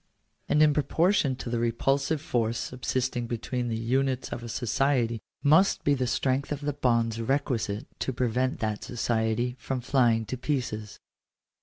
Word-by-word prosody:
And 150 - +5
in 150 -1 +5
proportion 150 0 +2
to 125 - -6
the 120 - 0
repulsive 135 +6 0
force 115 -4 0
sub 125 +2 -6
sisting 125 -1 -1
between 120 +1 -3
the 115 -1 -2
units 130 +3 0
of 120 - -5
a 120 - -7
society 120 -1 0 0.2
must 160 +7 +4
be 145 - +3
the 130 -2 0
strength 130 +3 0
of 145 -1 -2
the 145 0 -1
bonds 115 -4 +1
requisite 115 -4 -1
to - - -1
prevent 125 +1 0
that 110 -2 -2
society 120 0 -1
from 135 -1 -3
flying 120 -3 +2
to 130 - -4
pieces. 120 -6 -3
125 Hz, 160 wpm, -27 LUFS, 115-135 Hz, 0.2 s, And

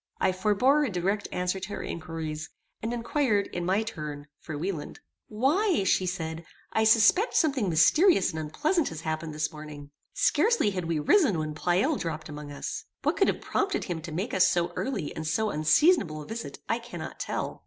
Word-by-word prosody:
I - - +3
forbore 215 +10 +3
a 280 - 0
direct 195 +2 -1
answer 180 +1 -1
to 190 +2 -6
her - - -5
inquiries, 160 -2 -5 0.3
and 225 - -2
inquired, 235 -3 +1
in 175 0 -3
my 195 +4 +2
turn, 150 -9 -6
for 155 - -6
Wieland. 165 -1 -4 0.3
"Why," 295 - +2
said 180 -4 0
she, - - -29 0.3
"I 220 - +2
suspect 225 - +5
something 275 - +2
mysterious 195 - +4
and 160 - -5
unpleasant 295 - 0
has 160 -1 -7
happened 155 -1 -3
this 155 0 -1
morning. 150 -2 -10 0.2
Scarcely 390 - +3
had 185 -3 -3
we 165 -1 -1
risen 210 - +3
when 155 -1 -3
Pleyel 180 - +1
dropped 160 -2 -4
among 150 -1 -8
us. 140 - -5 0.2
What - - +1
could - - +3
have - - 0
prompted 390 -2 -1
him 170 -4 -4
to 165 0 -8
make 190 +10 -3
us 185 - +5
so 175 0 0
early 255 - -3
and 160 0 -4
so 210 +7 0
unseasonable 155 - +3
a - - -12
visit 225 +5 -6
I - - 0
cannot - - -8
tell. - - -3
180 Hz, 185 wpm, -27 LUFS, 155-230 Hz, 0.3 s, suspect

